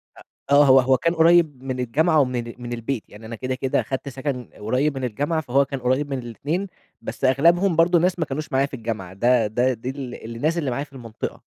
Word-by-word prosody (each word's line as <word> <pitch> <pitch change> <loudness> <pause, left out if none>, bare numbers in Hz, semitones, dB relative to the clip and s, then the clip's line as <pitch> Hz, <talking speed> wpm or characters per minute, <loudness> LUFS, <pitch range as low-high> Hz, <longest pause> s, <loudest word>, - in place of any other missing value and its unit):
أ - - -15 0.3
آه 145 0 +7
هو 135 0 +7
هو 130 0 +3
كان 165 0 0
قريب 160 -5 +4
من 130 -1 -4
الجامعة 155 +7 +2
ومن 125 -2 +1
ال 115 - -8
من 120 0 -5
البيت، 115 0 -3
يعني 110 +2 -13
أنا 115 +1 -6
كده 130 +3 -3
كده 130 0 0
خدت 135 +1 -4
سكن 130 -2 -4
قريب 130 +7 0
من 130 - -4
الجامعة، 145 +7 -1
فهو 140 +1 +2
كان 135 -1 -5
قريب 130 +4 0
من 135 -2 -2
الاتنين، 145 - -3 0.3
بس - - -4
أغلبهم 170 +7 +3
برضه 170 +1 +4
ناس 180 +1 +1
ما 160 - +1
كانوش 155 +3 -5
معايا 135 +1 +2
في 140 - -11
الجامعة، 110 -6 -5
ده 120 +2 +2
ده 125 +4 +1
دي 125 +3 -6
ال 125 -4 -7
الناس 155 +8 0
اللي 140 -6 -1
معايا 140 +4 -2
في 140 -2 -16
المنطقة. 115 -4 -7
135 Hz, 230 wpm, -23 LUFS, 120-150 Hz, 0.3 s, آه